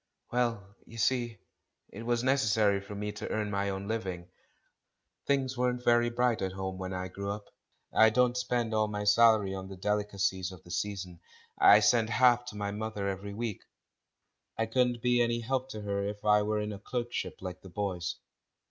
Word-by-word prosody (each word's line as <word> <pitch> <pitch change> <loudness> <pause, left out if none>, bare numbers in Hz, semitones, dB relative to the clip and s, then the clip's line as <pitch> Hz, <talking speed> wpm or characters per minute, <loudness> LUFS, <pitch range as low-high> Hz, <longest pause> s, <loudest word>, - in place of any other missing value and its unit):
"Well, 115 -5 -1
you 115 - -11
see, 120 0 0 0.5
it 105 - -9
was 120 0 +1
necessary 110 -6 +3
for 100 +1 -9
me 105 +1 -3
to 105 - -6
earn 105 -1 -1
my 100 0 0
own 95 0 -4
living; 95 -6 -4 1.0
things 135 -2 +1
weren't 125 0 -1
very 120 0 +4
bright 120 -1 +1
at 95 -1 -2
home 95 -1 -4
when 95 0 -4
I 95 0 -3
grew 100 +2 -5
up. 100 0 -6 0.4
I 110 - +7
don't 125 +2 +2
spend 125 -2 -1
all 110 0 +2
my 105 -1 -3
salary 105 -1 +5
on 95 0 -5
the 95 -1 -9
delicacies 100 -2 -1
of 90 -3 -12
the 85 - -12
season 95 -3 -3 0.2
— - - -34
I 105 +1 +8
send 110 +1 +3
half 120 +1 +4
to 110 -4 -8
my 100 -1 -2
mother 105 -1 -3
every 100 +1 -4
week. 115 -2 -3 1.0
I 115 - +1
couldn't 120 +1 +1
be 125 0 +3
any 120 0 +1
help 130 +2 -2
to 110 -5 -6
her 100 -1 -2
if 105 +1 -6
I 105 0 +5
were 105 +1 0
in 105 0 -3
a 100 - -8
clerkship 120 +2 -3
like 90 -1 -7
the 95 - -12
boys. 90 -2 -3
105 Hz, 190 wpm, -30 LUFS, 100-120 Hz, 1.0 s, I